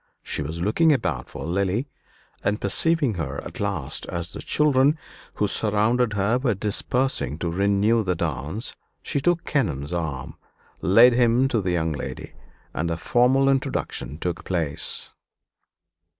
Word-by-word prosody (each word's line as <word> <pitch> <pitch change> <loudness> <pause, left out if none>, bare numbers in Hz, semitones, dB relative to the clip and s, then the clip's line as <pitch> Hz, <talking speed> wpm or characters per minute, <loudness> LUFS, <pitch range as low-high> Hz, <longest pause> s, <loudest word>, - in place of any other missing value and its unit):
She - - -3
was 80 +4 -4
looking 155 - +3
about 80 - -1
for - - -7
Lily; 100 - 0 0.6
and 105 +1 0
perceiving 145 +5 +1
her 75 -6 -4
at - - -9
last - - -3
as 85 0 -4
the - - -6
children 145 0 +3 0.4
who 105 - +1
surrounded 110 +3 +1
her 105 +4 +1
were 125 -5 +1
dispersing 105 - 0
to 85 0 -2
renew 100 +5 +2
the 90 -2 0
dance, 80 - -3 0.3
she - - -1
took 175 +2 +1
Kenelm's 90 - -1
arm, 75 -6 -4 0.4
led 115 +6 +6
him 120 +1 +3
to 115 -5 +1
the 90 - -2
young 80 -2 0
lady, 70 - -6 0.4
and 85 +2 -1
a 85 - -1
formal 125 +8 +3
introduction 135 - -1
took 85 0 -3
place. 85 -6 -2
100 Hz, 145 wpm, -24 LUFS, 85-125 Hz, 0.6 s, led